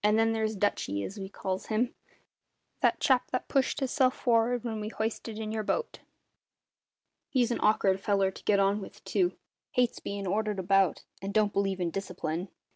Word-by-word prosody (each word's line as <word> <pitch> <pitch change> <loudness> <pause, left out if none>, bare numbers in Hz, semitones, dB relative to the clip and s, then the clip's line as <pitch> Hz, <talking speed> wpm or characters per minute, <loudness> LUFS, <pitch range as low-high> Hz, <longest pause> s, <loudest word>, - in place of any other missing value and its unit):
Then 220 +2 +4
there's 220 -1 0
`Dutchy', 100 - 0
as 200 - -7
we 190 0 -5
calls 190 -1 -4
him 230 +3 0 0.9
that - - +3
chap 260 -2 +3
that 255 - -2
pushed 275 +1 +1
hisself 260 -1 +2
for'ard 240 -1 +2
when 225 -3 -3
we 210 - -3
hoisted 220 0 -3
in 220 -1 -4
your 220 0 -1
boat 460 - -2 1.3
he's 250 -3 +2
an - - 0
awk'ard 195 -3 +3
feller 195 -1 +2
to - - -13
get 200 -1 +3
on 200 +1 +2
with, - - -11
too; 360 -2 +1 0.4
hates 250 -1 +2
bein' 200 0 -4
ordered 210 +2 0
about, 195 +1 +2 0.2
and 195 +2 -5
don't 210 -1 +3
believe 195 -1 0
in 175 -2 0
discipline. 180 -2 -3
210 Hz, 175 wpm, -29 LUFS, 195-230 Hz, 1.3 s, Then